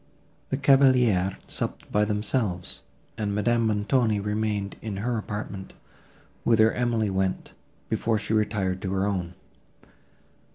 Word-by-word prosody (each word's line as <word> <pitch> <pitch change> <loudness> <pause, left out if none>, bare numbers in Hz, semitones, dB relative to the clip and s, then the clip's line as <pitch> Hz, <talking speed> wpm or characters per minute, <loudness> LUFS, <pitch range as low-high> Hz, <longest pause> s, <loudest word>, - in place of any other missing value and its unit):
The 135 - 0
cavaliers 125 -9 +4
supped - - -5
by 105 0 +3
themselves, 105 -3 -2 0.4
and 100 -2 -1
Madame 115 +2 +2
Montoni 110 +1 +2
remained 105 -1 -2
in 105 -4 -4
her 120 +4 -1
apartment, 105 -3 -5 0.7
whither 110 -1 +5
Emily 115 -4 0
went, 95 0 -1 0.3
before 115 -1 0
she 110 +1 -3
retired 100 -4 0
to 95 -1 -2
her 95 0 +1
own. 90 -3 -2
105 Hz, 120 wpm, -26 LUFS, 100-115 Hz, 0.7 s, whither